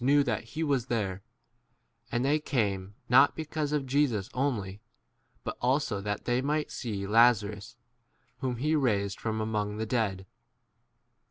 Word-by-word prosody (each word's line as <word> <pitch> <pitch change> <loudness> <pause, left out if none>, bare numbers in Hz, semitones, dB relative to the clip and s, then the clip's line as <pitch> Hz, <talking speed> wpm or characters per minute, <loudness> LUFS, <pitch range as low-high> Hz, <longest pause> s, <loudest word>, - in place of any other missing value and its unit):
knew 145 +2 +5
that - - -1
he 160 - 0
was 140 -6 +1
s - - -34
there; 100 -6 -1 0.9
and 120 +1 0
they 150 +3 +3
came, 100 -9 -1
not 135 +3 +6
because 155 -2 -3
of 150 -2 0
Jesus 130 -7 +1
only, 105 -7 -2 0.6
but - - -4
also 125 -5 +1
that 105 0 -3
they 120 +1 +1
might 150 +2 -1
see 105 -5 -4
Laza 110 0 +5
rus 105 +4 -11 0.6
whom 130 -2 -1
he 150 +6 +1
raised 100 -9 +1
from 110 -1 -2
among 105 -1 -1
10 - - -7
[the] 110 - -2
dead. 105 -5 -1
120 Hz, 160 wpm, -29 LUFS, 105-140 Hz, 0.9 s, not